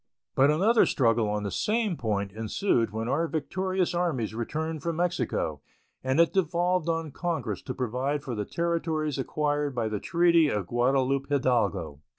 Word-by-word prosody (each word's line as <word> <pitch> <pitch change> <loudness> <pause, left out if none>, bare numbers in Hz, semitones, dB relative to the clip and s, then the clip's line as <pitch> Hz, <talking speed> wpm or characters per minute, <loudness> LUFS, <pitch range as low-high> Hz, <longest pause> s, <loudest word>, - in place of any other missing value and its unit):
But 135 +2 +4
another 200 +10 +4
struggle 115 -4 +2
on 105 0 -1
the 100 - -3
same 215 - 0
point 105 -7 -2
ensued 115 - 0
when 110 +2 -4
our 155 +6 +1
victorious 185 +5 -1
armies 160 -12 -1
returned 155 +7 -3
from 170 +1 -2
Mexico 145 - -1 0.4
and 130 +3 +1
it 170 - +4
devolved 175 -1 +1
on 165 -2 -1
Congress 140 - -3
to 130 - -6
provide 130 +4 -2
for 130 -4 -4
the 105 -2 -2
territories 160 0 -1
acquired 145 0 -1
by 115 -2 0
the 105 -1 -2
treaty 170 - +4
of 105 -6 -1
Guadalupe 130 +5 +1
Hidalgo. 125 - 0
145 Hz, 160 wpm, -27 LUFS, 115-170 Hz, 0.4 s, But